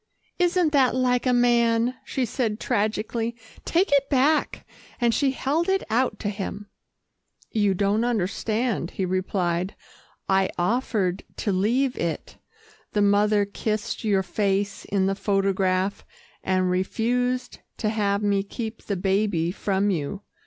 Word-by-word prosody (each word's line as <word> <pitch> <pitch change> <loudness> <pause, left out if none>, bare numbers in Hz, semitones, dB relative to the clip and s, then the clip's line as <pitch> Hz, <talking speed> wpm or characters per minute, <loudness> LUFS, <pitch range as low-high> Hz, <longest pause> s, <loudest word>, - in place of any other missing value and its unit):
"Isn't 355 -2 +3
that 265 -4 +3
like 250 0 +1
a - - +4
man," 240 -1 +3
she 260 - -1
said 225 -2 -2
tragically. 225 +2 -1 0.3
"Take 360 +2 +2
it 280 -1 +3
back," 290 +3 +1 0.3
and 240 -2 +2
she 280 +2 +2
held 290 +6 0
it 385 0 +2
out 250 +3 +1
to 205 - -1
him. 205 0 -6 0.8
"You 205 -3 +2
don't 200 +4 +1
understand," 220 -2 -1
he 190 - 0
replied. 185 -1 -1 0.5
"I 190 0 +3
offered 195 -1 0 0.2
to 205 - -1
leave 240 +8 +1
it. 165 -1 -3 0.6
The 205 - +2
mother 205 0 +3
kissed 215 +2 -3
your 200 -3 +2
face 200 +1 -1
in 195 -1 +1
the 195 - +1
photograph, 195 -1 0 0.4
and 185 -1 +1
refused 245 +7 -1 0.2
to 215 - 0
have 205 -1 0
me 200 -1 +2
keep 220 +2 -6
the 200 - -2
baby 190 -3 +1
from 200 +1 0
you. 180 +4 -3
210 Hz, 135 wpm, -25 LUFS, 195-245 Hz, 0.8 s, a